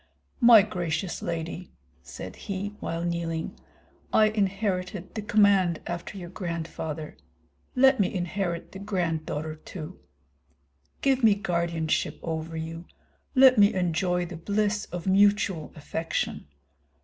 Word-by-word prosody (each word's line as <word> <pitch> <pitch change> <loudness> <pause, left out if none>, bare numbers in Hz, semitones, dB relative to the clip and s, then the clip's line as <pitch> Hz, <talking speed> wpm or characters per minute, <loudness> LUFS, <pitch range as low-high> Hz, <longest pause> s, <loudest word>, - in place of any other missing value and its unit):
"My 235 -5 +8
gracious 175 -3 -3
lady," 170 +2 -4 0.3
said 65 +9 -9
he, 200 +1 -4
while 165 +1 -3
kneeling, 170 -1 -2 0.6
"I 215 0 +5
inherited 195 -2 -2
the 220 - -3
command 200 -6 +3
after 175 +3 -5
your 175 -2 -8
grandfather; 160 -4 -5 0.6
let 265 0 +5
me 195 - +2
inherit 175 -1 -3
the 190 - -9
granddaughter 160 -5 -2
too. 155 +2 -9 1.0
Give 270 -2 +2
me 215 -3 +6
guardianship 170 -4 -1
over 160 0 -4
you; 165 +1 -6 0.5
let 260 -3 +7
me 200 -1 +6
enjoy 180 0 +1
the 175 -1 -7
bliss 205 +4 0
of 175 -1 -7
mutual 195 -4 +3
affection. 160 - -3
180 Hz, 115 wpm, -27 LUFS, 165-205 Hz, 1.0 s, My